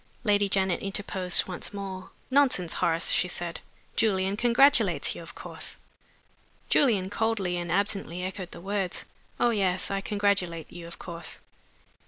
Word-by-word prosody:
Lady 205 Hz, -2 st, +3 dB
Janet 190 Hz, -2 st, +1 dB
interposed 195 Hz, -2 st, +2 dB
once 185 Hz, +2 st, -5 dB
more. 190 Hz, -2 st, -6 dB, 0.2 s
"Nonsense, 255 Hz, -11 st, +3 dB
Horace," 165 Hz, 0 st, +3 dB
she 180 Hz, -, +3 dB
said. 175 Hz, -1 st, -3 dB, 0.4 s
"Julian 195 Hz, -2 st, +2 dB
congratulates 245 Hz, +5 st, +4 dB
you, -, -, -8 dB
of -, -, -11 dB
course." -, -, -5 dB, 0.9 s
Julian 205 Hz, -9 st, +3 dB
coldly 205 Hz, -5 st, 0 dB
and 175 Hz, -1 st, -3 dB
absently 195 Hz, -2 st, -1 dB
echoed 185 Hz, -1 st, -5 dB
the -, -, -11 dB
words. 195 Hz, -1 st, -2 dB, 0.3 s
"Oh, 240 Hz, -, +4 dB
yes! 190 Hz, -4 st, +1 dB
I 195 Hz, 0 st, -1 dB
congratulate 195 Hz, -6 st, 0 dB
you, 170 Hz, -1 st, -8 dB
of 170 Hz, -, -9 dB
course." 170 Hz, -2 st, -7 dB
190 Hz, 140 wpm, -28 LUFS, 180-205 Hz, 0.9 s, congratulates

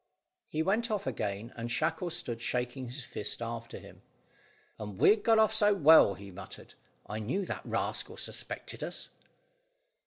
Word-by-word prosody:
He 155 Hz, +1 st, 0 dB
went 220 Hz, +6 st, +1 dB
off 210 Hz, -3 st, -1 dB
again, 105 Hz, -3 st, -3 dB
and 115 Hz, 0 st, -4 dB
Shackle 160 Hz, +7 st, 0 dB
stood 120 Hz, -7 st, -4 dB
shaking 125 Hz, +2 st, -2 dB
his 130 Hz, +3 st, -6 dB
fist 105 Hz, -3 st, -4 dB
after 115 Hz, 0 st, -5 dB
him. -, -, -13 dB, 0.8 s
"And 105 Hz, -3 st, -6 dB
we'd 210 Hz, -, +5 dB
got 225 Hz, +1 st, +4 dB
off 220 Hz, 0 st, +5 dB
so 210 Hz, -2 st, +4 dB
well," 160 Hz, -, +7 dB
he 100 Hz, 0 st, -10 dB
muttered. 95 Hz, +2 st, -10 dB, 0.3 s
"I 105 Hz, -, -4 dB
knew 135 Hz, -, -1 dB
that -, -, -4 dB
rascal -, -, -2 dB
suspected -, -, -5 dB
us." -, -, -4 dB
125 Hz, 155 wpm, -31 LUFS, -, 0.8 s, well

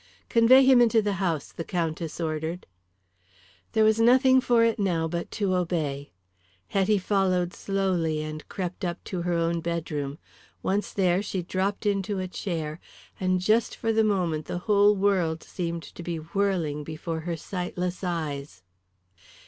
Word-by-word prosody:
"Convey 240 Hz, +3 st, +6 dB
him 260 Hz, -2 st, +7 dB
into 230 Hz, -1 st, +4 dB
the 205 Hz, -2 st, 0 dB
house," 165 Hz, -6 st, -1 dB
the 165 Hz, -, -5 dB
Countess 165 Hz, -2 st, -3 dB
ordered. 160 Hz, +2 st, -3 dB, 1.1 s
There 220 Hz, -1 st, +4 dB
was 220 Hz, +1 st, +4 dB
nothing 260 Hz, +3 st, +5 dB
for 240 Hz, -2 st, +3 dB
it 230 Hz, -1 st, +2 dB
now 170 Hz, -5 st, +1 dB
but 170 Hz, +1 st, -4 dB
to 200 Hz, -4 st, +1 dB
obey. 160 Hz, -6 st, -1 dB, 0.6 s
Hetty 200 Hz, +2 st, +2 dB
followed 185 Hz, -2 st, +1 dB
slowly 180 Hz, -6 st, -1 dB
and 155 Hz, 0 st, -7 dB
crept 185 Hz, 0 st, -5 dB
up 175 Hz, -1 st, -3 dB
to 180 Hz, -2 st, -4 dB
her 175 Hz, 0 st, -1 dB
own 170 Hz, 0 st, +1 dB
bedroom. 155 Hz, -4 st, -3 dB, 0.5 s
Once 200 Hz, +2 st, 0 dB
there, 185 Hz, -1 st, +2 dB
she 190 Hz, -3 st, -3 dB
dropped 190 Hz, +4 st, -2 dB
into 200 Hz, 0 st, 0 dB
a 185 Hz, 0 st, -2 dB
chair, 165 Hz, -4 st, -4 dB, 0.4 s
and 185 Hz, -1 st, +1 dB
just 215 Hz, +5 st, +2 dB
for 225 Hz, 0 st, -1 dB
the 220 Hz, 0 st, +3 dB
moment 175 Hz, -7 st, 0 dB
the -, -, -3 dB
whole 205 Hz, -1 st, +5 dB
world 185 Hz, -5 st, +1 dB
seemed 170 Hz, -2 st, -4 dB
to -, -, -10 dB
be 170 Hz, -1 st, -3 dB
whirling 165 Hz, -3 st, -1 dB
before 160 Hz, +2 st, -5 dB
her 170 Hz, +1 st, -4 dB
sightless 180 Hz, +1 st, -4 dB
eyes. 145 Hz, -, -4 dB
180 Hz, 155 wpm, -26 LUFS, 165-200 Hz, 1.1 s, him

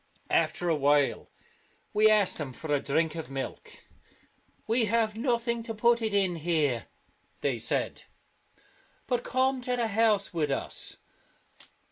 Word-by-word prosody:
After 175 Hz, -, +1 dB
a 165 Hz, -, +3 dB
while 145 Hz, -1 st, +2 dB, 0.6 s
we 215 Hz, +1 st, +5 dB
asked 210 Hz, -5 st, +3 dB
them 140 Hz, -4 st, -5 dB
for 150 Hz, +3 st, -4 dB
a 145 Hz, -, +3 dB
drink 155 Hz, +3 st, 0 dB
of 160 Hz, -3 st, -6 dB
milk. 135 Hz, -1 st, -7 dB, 0.4 s
" -, -, -37 dB, 0.2 s
We 225 Hz, +1 st, +2 dB
have 220 Hz, 0 st, +1 dB
nothing 235 Hz, -1 st, 0 dB
to 225 Hz, -1 st, -6 dB
put 235 Hz, +2 st, +3 dB
it 220 Hz, -1 st, -1 dB
in 190 Hz, -4 st, +1 dB
here," 150 Hz, -7 st, 0 dB, 0.5 s
they 135 Hz, -5 st, 0 dB
said, 115 Hz, -, -1 dB, 0.5 s
" -, -, -33 dB
but 245 Hz, -2 st, -1 dB
come 260 Hz, 0 st, +1 dB
to 250 Hz, 0 st, -1 dB
the 235 Hz, -2 st, 0 dB
house 215 Hz, -2 st, +2 dB
with 155 Hz, -3 st, 0 dB
us." 135 Hz, -, -3 dB
200 Hz, 150 wpm, -28 LUFS, 150-230 Hz, 0.6 s, we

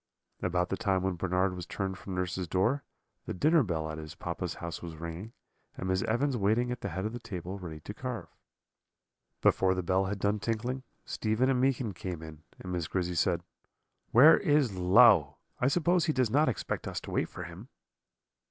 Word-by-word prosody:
"About 90 Hz, 0 st, 0 dB
the 95 Hz, -, -1 dB
time 95 Hz, -2 st, +1 dB
when 95 Hz, 0 st, 0 dB
Bernard 90 Hz, +1 st, 0 dB
was 90 Hz, -1 st, -7 dB
turned 95 Hz, +1 st, -3 dB
from 95 Hz, 0 st, -7 dB
nurse's 90 Hz, 0 st, -2 dB
door, 115 Hz, -, +1 dB, 0.4 s
the -, -, -3 dB
dinner 155 Hz, -, +4 dB
bell 85 Hz, -, -1 dB
at 80 Hz, -, -6 dB
his 80 Hz, +2 st, -8 dB
papa's 85 Hz, +1 st, -4 dB
house 85 Hz, -1 st, -6 dB
was 85 Hz, -2 st, -7 dB
ringing, 85 Hz, +6 st, -7 dB, 0.5 s
and 95 Hz, -, -4 dB
Miss 95 Hz, 0 st, +1 dB
Evans 130 Hz, +5 st, +1 dB
waiting 115 Hz, +3 st, +1 dB
at 125 Hz, -, -4 dB
the 100 Hz, -, -3 dB
head 95 Hz, +3 st, -3 dB
of 110 Hz, -, -3 dB
the 120 Hz, -, -5 dB
table 95 Hz, -4 st, -6 dB
ready 80 Hz, -4 st, -8 dB
to 100 Hz, -, -7 dB
carve. 125 Hz, 0 st, -5 dB, 1.2 s
"Before 95 Hz, -1 st, +4 dB
the 90 Hz, -, -2 dB
bell 95 Hz, +2 st, +2 dB
had 100 Hz, +1 st, -2 dB
done 100 Hz, +2 st, 0 dB
tinkling, 120 Hz, +5 st, -2 dB, 0.2 s
Stephen 115 Hz, +4 st, +1 dB
and 125 Hz, -1 st, +1 dB
Meekin 130 Hz, -5 st, +1 dB
came 85 Hz, -2 st, -6 dB
in, 80 Hz, -1 st, -10 dB, 0.2 s
and 90 Hz, -, -7 dB
Miss 85 Hz, -3 st, -2 dB
Grizzy 90 Hz, -2 st, -1 dB
said: 85 Hz, 0 st, +1 dB, 0.7 s
"'Where 145 Hz, +8 st, +8 dB
is 145 Hz, -, +2 dB
Low? 90 Hz, -, +6 dB, 0.2 s
I 125 Hz, -, +2 dB
suppose 175 Hz, +4 st, +2 dB
he 155 Hz, -, +1 dB
does 130 Hz, -5 st, +1 dB
not 145 Hz, +2 st, +4 dB
expect 120 Hz, -, -3 dB
us -, -, -3 dB
to -, -, -8 dB
wait -, -, 0 dB
for -, -, -7 dB
him.' -, -, -10 dB
95 Hz, 200 wpm, -30 LUFS, 90-120 Hz, 1.2 s, Where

